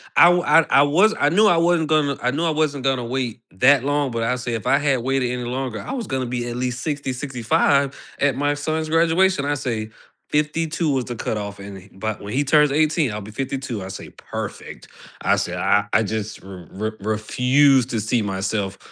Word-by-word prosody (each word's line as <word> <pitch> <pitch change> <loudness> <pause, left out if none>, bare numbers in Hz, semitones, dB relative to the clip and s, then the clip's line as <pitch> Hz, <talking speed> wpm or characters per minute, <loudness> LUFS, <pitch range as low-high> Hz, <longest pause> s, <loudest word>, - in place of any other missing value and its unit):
I - - +8
w 175 0 +5
I 165 - +5
I 140 - +6
was 185 +10 +4
I 145 - +3
knew 205 +7 +4
I 175 -5 +4
wasn't 170 -2 +2
gonna 145 -3 +2
I 125 +1 +1
knew 155 +5 -2
I - - +2
wasn't 150 -3 -1
gonna 130 -2 +1
wait 125 -2 -3
that 125 +7 +4
long, 145 -1 0
but 115 -1 -2
I 125 +2 0
said 125 -1 -4
if 110 - -4
I 140 - +4
had 140 -3 +1
waited 130 0 0
any 125 0 -3
longer, 125 -2 -4
I - - -7
was 255 -4 -4
gonna 130 -1 -2
be 120 0 -3
at 120 - -5
least 125 0 -3
60, 145 -3 -3
65 135 +1 0 0.2
at 140 -3 +2
my 145 +1 +1
son's 155 +2 -2
graduation. 165 +1 +2
I 145 - 0
say 115 -5 -3 0.4
52 155 +1 0
was 130 -2 0
the 120 - -6
cutoff, 100 -2 -4
and 100 0 -9
he 95 +2 -15
but 110 +2 -5
when 100 +1 -7
he 140 - +1
turns 150 0 +4
18, 155 -2 +1
I'll 105 - -4
be 105 +2 -10
52. 130 -3 -4
I 95 - -7
say, - - -8
"Perfect." - - -8 0.3
I - - +3
say, - - -2
I 105 0 +2
I 110 - +4
just 110 0 -4
r 95 -3 -11
r 110 +1 -2
refuse 125 +6 +2
to 115 -3 -2
see 110 +3 0
myself 100 0 -2
130 Hz, 220 wpm, -21 LUFS, 110-150 Hz, 0.4 s, I